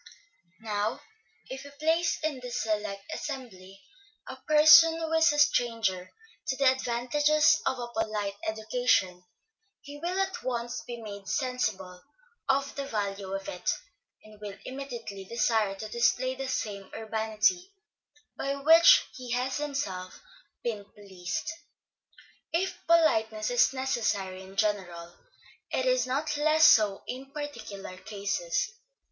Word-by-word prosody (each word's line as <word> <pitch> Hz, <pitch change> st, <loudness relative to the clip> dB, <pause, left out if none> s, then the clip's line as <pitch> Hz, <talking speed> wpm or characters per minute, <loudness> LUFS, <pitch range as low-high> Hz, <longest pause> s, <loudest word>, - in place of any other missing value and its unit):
Now 210 Hz, 0 st, -2 dB, 0.5 s
if 265 Hz, +1 st, -7 dB
we 285 Hz, -, -10 dB
place 325 Hz, +3 st, +2 dB
in 300 Hz, -4 st, -1 dB
this 250 Hz, -1 st, -4 dB
select 210 Hz, -2 st, -2 dB
assembly, 200 Hz, -10 st, -7 dB, 0.4 s
a -, -, -6 dB
person 310 Hz, +2 st, +8 dB
who 325 Hz, -1 st, -3 dB
is 320 Hz, 0 st, +5 dB
a 295 Hz, -, -2 dB
stranger 230 Hz, -10 st, +1 dB, 0.4 s
to 265 Hz, -, -1 dB
the 275 Hz, -2 st, +5 dB
advantages 290 Hz, +5 st, +2 dB
of 260 Hz, -, 0 dB
a 240 Hz, -1 st, -5 dB
polite 210 Hz, -3 st, -2 dB
education, 220 Hz, -4 st, +1 dB, 0.6 s
he 290 Hz, +1 st, -11 dB
will 355 Hz, +4 st, -2 dB
at 385 Hz, -1 st, -1 dB
once 240 Hz, -1 st, -3 dB
be 240 Hz, -1 st, -6 dB
made 200 Hz, -3 st, -9 dB
sensible 215 Hz, -9 st, -2 dB, 0.5 s
of 275 Hz, +1 st, +1 dB
the 280 Hz, -1 st, -4 dB
value 200 Hz, -4 st, -3 dB
of 195 Hz, 0 st, -6 dB
it, 180 Hz, 0 st, -3 dB, 0.5 s
and 215 Hz, -1 st, -16 dB
will 200 Hz, -1 st, -7 dB
immediately 240 Hz, -7 st, -7 dB
desire 220 Hz, -2 st, +1 dB
to 215 Hz, +2 st, -7 dB
display 240 Hz, +3 st, +1 dB
the 265 Hz, +1 st, -5 dB
same 205 Hz, -6 st, -4 dB
urbanity 220 Hz, -, 0 dB, 0.6 s
by 275 Hz, 0 st, -2 dB
which 325 Hz, +4 st, +7 dB
he 255 Hz, -1 st, -9 dB
has 255 Hz, +2 st, -1 dB
himself 205 Hz, -12 st, -4 dB, 0.4 s
been 220 Hz, -4 st, -3 dB
pleased. 195 Hz, -2 st, -6 dB, 1.0 s
If 365 Hz, +4 st, 0 dB
politeness 220 Hz, -10 st, +3 dB
is 245 Hz, 0 st, +4 dB
necessary 215 Hz, -8 st, -1 dB
in 190 Hz, +1 st, -13 dB
general, 185 Hz, -5 st, -2 dB, 0.6 s
it -, -, -1 dB
is -, -, +2 dB
not 290 Hz, +3 st, -1 dB
less 310 Hz, +1 st, +3 dB
so 210 Hz, -3 st, +4 dB
in 265 Hz, +2 st, -7 dB
particular 220 Hz, -11 st, -7 dB
cases. 215 Hz, -, -2 dB
240 Hz, 130 wpm, -28 LUFS, 205-285 Hz, 1.0 s, person